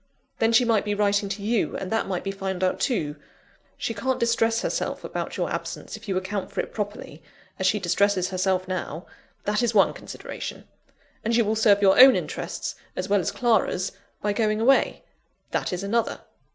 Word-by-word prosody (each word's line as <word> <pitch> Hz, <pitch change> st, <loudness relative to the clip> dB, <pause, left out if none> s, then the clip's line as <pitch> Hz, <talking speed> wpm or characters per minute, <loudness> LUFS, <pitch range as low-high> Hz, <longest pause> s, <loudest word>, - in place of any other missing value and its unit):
Then 225 Hz, 0 st, +3 dB
she 230 Hz, +2 st, +5 dB
might 225 Hz, -3 st, +2 dB
be 205 Hz, 0 st, -1 dB
writing 205 Hz, 0 st, +1 dB
to 200 Hz, +1 st, -4 dB
you, 225 Hz, +1 st, 0 dB
and 185 Hz, -, -5 dB
that 225 Hz, -, 0 dB
might 185 Hz, -2 st, -2 dB
be 195 Hz, -, -2 dB
found 190 Hz, -1 st, -3 dB
out, 185 Hz, -, +1 dB
too. 155 Hz, -, -1 dB, 0.6 s
She 230 Hz, -, -2 dB
can't 260 Hz, +5 st, -1 dB
distress 230 Hz, -1 st, +2 dB
herself -, -, -2 dB
about -, -, -4 dB
your -, -, 0 dB
absence, -, -, -5 dB
if -, -, -12 dB
you 190 Hz, -2 st, 0 dB
account 190 Hz, +1 st, -3 dB
for -, -, -4 dB
it -, -, -3 dB
properly, 205 Hz, -7 st, -5 dB, 0.4 s
as 190 Hz, -, +2 dB
she 210 Hz, -, +2 dB
distresses 195 Hz, 0 st, +2 dB
herself 185 Hz, 0 st, 0 dB
now 180 Hz, -2 st, -4 dB, 0.4 s
that 210 Hz, +3 st, +1 dB
is 235 Hz, -2 st, 0 dB
one 195 Hz, -, +5 dB
consideration. -, -, -8 dB, 0.6 s
And 230 Hz, +1 st, +1 dB
you 235 Hz, -1 st, +4 dB
will 215 Hz, +2 st, +1 dB
serve 205 Hz, -2 st, +4 dB
your 195 Hz, +2 st, +5 dB
own 260 Hz, +1 st, +10 dB
interests, -, -, -4 dB, 0.2 s
as 185 Hz, +2 st, -3 dB
well 205 Hz, 0 st, +4 dB
as 175 Hz, -, -1 dB
Clara's, 215 Hz, -6 st, +1 dB, 0.3 s
by 205 Hz, 0 st, +1 dB
going 215 Hz, 0 st, +1 dB
away 265 Hz, +4 st, +3 dB, 0.5 s
that -, -, -1 dB
is 180 Hz, +1 st, -3 dB
another." 225 Hz, +4 st, 0 dB
205 Hz, 190 wpm, -25 LUFS, 190-225 Hz, 0.6 s, own